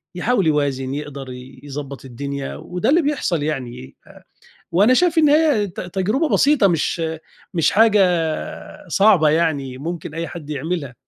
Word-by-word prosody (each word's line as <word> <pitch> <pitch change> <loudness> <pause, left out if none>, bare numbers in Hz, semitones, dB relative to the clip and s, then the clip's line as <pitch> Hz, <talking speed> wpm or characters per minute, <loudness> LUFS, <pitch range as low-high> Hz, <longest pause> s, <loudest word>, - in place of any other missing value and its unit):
يحاول 200 0 +1
يوازن، 140 -3 0
يقدر 140 -2 -6
ي 125 +1 -11
يضبط 140 -1 -7
الدنيا 140 +2 -5
وده 180 +6 -3
اللي 330 +5 +4
بيحصل 265 - -1
يعني 125 - -5
أ - - -16 0.6
وأنا 205 +9 +5
شايف 345 +3 +2
إن 305 -2 +5
هي 295 -8 +3
ت 180 - -8
تجربة 195 - -1
بسيطة، 285 -8 +4
مش 165 0 0 0.5
مش 165 -3 +3
حاجة 215 0 +4 0.9
صعبة 185 -3 +4
يعني 145 -5 0
ممكن 160 +1 -6
أي 165 +1 -4
حد 155 -3 -9
يعملها. 150 -2 -4
165 Hz, 145 wpm, -20 LUFS, 140-210 Hz, 0.9 s, وأنا